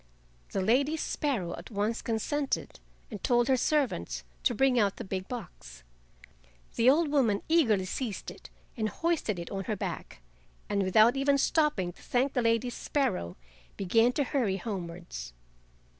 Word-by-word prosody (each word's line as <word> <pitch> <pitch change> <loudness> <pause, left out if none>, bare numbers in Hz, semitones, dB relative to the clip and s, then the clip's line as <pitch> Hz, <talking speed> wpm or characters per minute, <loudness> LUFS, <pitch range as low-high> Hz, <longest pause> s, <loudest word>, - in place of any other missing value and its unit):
The 195 - -1
Lady 275 +9 +2
Sparrow 240 - -1
at 170 - -10
once 215 +2 -1
consented, 270 +5 -2 0.3
and 205 -4 -7
told 240 -1 +3
her 265 - +4
servants 245 - 0 0.2
to - - +1
bring 260 0 +3
out 200 -3 +2
the - - -6
big 190 -1 -4
box. 175 - -8 0.9
The 235 +2 +5
old 305 +3 +4
woman 235 -9 +2
eagerly 230 - +3
seized 215 +2 -4
it - - -13 0.3
and 220 -3 -1
hoisted 325 - -1
it 170 -1 -6
on 195 -1 -3
her 215 - -1
back, 60 - -6 0.4
and 200 -1 0
without 215 +6 +5
even 280 +1 +3
stopping 275 - +1
to - - -19
thank 260 +3 0
the 250 - +1
Lady 230 +1 +1
Sparrow 235 - -1 0.4
began 225 +6 +3
to 285 - +1
hurry 240 -8 0
homewards. 170 - -6
230 Hz, 155 wpm, -29 LUFS, 190-270 Hz, 0.9 s, The